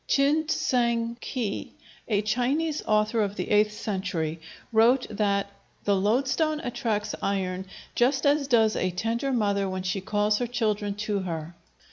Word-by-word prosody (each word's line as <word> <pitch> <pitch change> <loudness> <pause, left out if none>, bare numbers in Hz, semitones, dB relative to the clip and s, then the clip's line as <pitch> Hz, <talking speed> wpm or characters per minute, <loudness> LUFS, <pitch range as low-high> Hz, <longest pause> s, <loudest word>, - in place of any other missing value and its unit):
Chin 290 +3 +3
T'sang 235 -6 +1
Khi, 230 -7 -3 0.3
a 210 -2 +1
Chinese 265 +8 0
author 215 +1 +2
of 205 -1 -1
the - - -4
eighth 210 0 +4
century, 185 -7 -3 0.3
wrote 240 +4 +5
that 200 -1 0 0.3
"the 200 - +2
loadstone 265 - +1
attracts 220 -4 -2
iron 190 -1 -1 0.3
just 265 +4 +2
as 285 0 +3
does 225 -4 +4
a 185 - 0
tender 230 +8 -1
mother 200 -5 +1
when 185 0 -3
she 185 +1 -1
calls 210 +2 +1
her 245 - -1
children 215 -4 -1
to 210 -1 -1
her." 165 -3 -4
215 Hz, 145 wpm, -26 LUFS, 200-245 Hz, 0.3 s, wrote